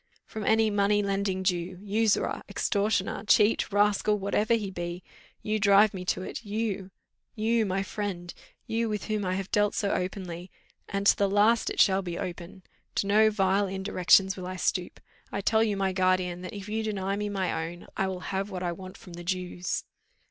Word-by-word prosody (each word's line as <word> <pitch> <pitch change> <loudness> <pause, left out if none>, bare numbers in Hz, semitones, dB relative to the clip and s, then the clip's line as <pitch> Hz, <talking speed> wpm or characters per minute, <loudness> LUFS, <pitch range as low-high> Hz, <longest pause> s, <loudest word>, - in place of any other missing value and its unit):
"From 220 - -6
any 220 +1 +3
money 205 0 +2
lending 195 -1 -1
Jew 180 -1 -1
usurer 210 +2 +1
extortioner 200 -2 0
cheat 210 +1 +3
rascal 205 +1 +2
whatever 210 +3 +1
he 205 -4 -3
be. 175 0 -5 0.4
You 215 0 0
drive 200 +1 +5
me 185 -1 -6
to 185 - -1
it - - -6
you 205 -3 -3 0.5
you 225 0 +1
my 190 +1 0
friend 185 -2 -5 0.3
you, 230 0 -1
with 210 -2 -3
whom 215 -2 -1
I 185 -1 -1
have 195 0 -4
dealt 210 0 +2
so 200 - 0
openly; 180 -1 -4 0.4
and 200 0 -2
to - - +7
the 200 -1 +1
last 210 +3 +3
it - - -5
shall 195 -1 +5
be 175 -2 -5
open. 180 +1 -7 0.3
To - - +1
no 215 +2 +5
vile 195 -1 +2
indirections 190 0 +3
will 185 -1 -6
I 185 - -5
stoop. 180 0 -1 0.3
I - - -2
tell 220 +2 +3
you, 210 -3 0
my 195 -1 0
guardian, 185 -1 +1
that 185 - -7
if 200 0 -7
you 220 +1 -2
deny 200 -3 -2
me 210 0 -2
my 185 -5 -1
own, 175 0 -11
I 190 - 0
will 185 -1 -4
have 195 +1 -3
what 185 -2 -5
I 175 - 0
want 185 +2 -9
from 180 - -13
the 175 0 -8
Jews." 180 0 -3
195 Hz, 190 wpm, -28 LUFS, 185-210 Hz, 0.5 s, to